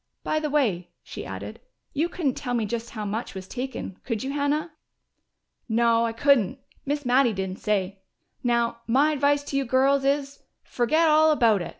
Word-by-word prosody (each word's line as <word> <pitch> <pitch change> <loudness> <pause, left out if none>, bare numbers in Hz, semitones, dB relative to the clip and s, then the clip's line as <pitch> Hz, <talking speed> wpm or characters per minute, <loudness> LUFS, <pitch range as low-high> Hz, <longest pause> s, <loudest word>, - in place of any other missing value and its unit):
By 310 - 0
the 305 -1 -2
way," 215 - 0
she - - -8
added, - - -7 0.3
"you 315 +4 0
couldn't 305 -8 -1
tell 245 -1 -3
me 230 -2 0
just 235 +2 -4
how 215 -2 -5
much 210 +1 -4
was 190 -1 -7
taken, 250 -6 -5
could 230 -1 -3
you, 270 - -3
Hannah?" 290 +3 -1 1.0
"No, 230 0 +3
I - - -2
couldn't. 250 -2 +2 0.3
Miss 290 0 -1
Mattie 245 -1 +4
didn't 190 -1 -4
say.... 200 -2 -1 0.4
Now, 235 -1 0
my 275 +6 +3
advice 285 0 +2
to 280 -1 -3
you 275 - +1
girls 270 +2 +2
is: 275 0 0 0.2
fergit 310 +7 +2
all 310 0 +5
about 230 -10 +3
it! - - -5
255 Hz, 180 wpm, -25 LUFS, 225-285 Hz, 1.0 s, all